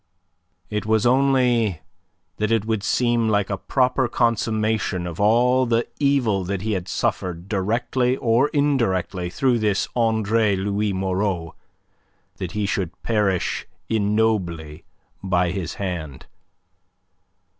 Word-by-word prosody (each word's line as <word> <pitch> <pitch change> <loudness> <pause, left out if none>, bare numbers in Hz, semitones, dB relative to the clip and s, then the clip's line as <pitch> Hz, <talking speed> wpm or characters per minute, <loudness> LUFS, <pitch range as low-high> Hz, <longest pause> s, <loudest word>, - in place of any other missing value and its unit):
It 105 0 -2
was 110 +1 +2
only 125 -7 +3 0.6
that 105 +1 -1
it 110 -2 +2
would 110 -2 -1
seem 120 +1 +1
like 105 -2 +1
a 100 - -1
proper 130 +2 +1
consummation 110 -5 0
of 85 -2 -6
all 125 +5 +3
the 115 0 +1
evil 130 -9 +2
that 95 +1 -3
he 110 - -1
had 95 -3 -2
suffered 90 -1 -2
directly 120 +5 0
or 120 +4 +2
indirectly 100 - 0
through 120 +6 +1
this 105 -3 +1
Andre 110 -2 +2
Louis 100 +2 -1
Moreau 95 -2 -1 0.8
that 90 - -5
he 105 0 -1
should 95 -3 -3
perish 105 -5 0 0.2
ignobly 100 -8 0 0.4
by 90 -2 +1
his 90 -3 -4
hand. 80 -9 -5
105 Hz, 120 wpm, -22 LUFS, 95-115 Hz, 0.8 s, only